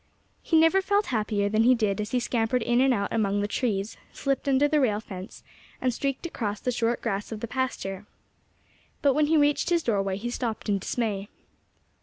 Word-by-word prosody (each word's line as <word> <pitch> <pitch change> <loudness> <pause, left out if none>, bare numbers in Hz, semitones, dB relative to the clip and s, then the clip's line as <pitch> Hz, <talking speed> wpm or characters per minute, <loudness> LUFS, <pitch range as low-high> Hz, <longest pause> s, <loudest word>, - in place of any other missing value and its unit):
He 325 - +2
never 325 +4 +5
felt 405 +2 +1
happier 210 -2 0
than 215 +2 +2
he 250 +3 +5
did 210 -3 0
as 210 - -4
he 250 - +1
scampered 235 0 0
in 240 +2 +2
and 265 0 +4
out 200 -5 -1
among 205 -2 +1
the 205 - 0
trees, 210 -3 -2
slipped 275 0 -1
under 275 +2 +4
the 305 0 +2
rail 215 -7 +2
fence, 190 -2 -9 0.4
and 255 -1 0
streaked 275 +5 -3
across 210 -11 -3
the 250 - -1
short 235 0 -1
grass 205 -2 -2
of 220 - -5
the 235 - -4
pasture. 210 -6 -3 1.0
But 280 -2 +5
when 300 +2 +2
he 320 +1 +3
reached 290 +2 +2
his 340 -2 +2
doorway 195 -4 0
he 240 +4 -4
stopped 235 -3 -3
in 200 -1 +2
dismay. 205 -1 -2
230 Hz, 200 wpm, -26 LUFS, 205-270 Hz, 1.0 s, never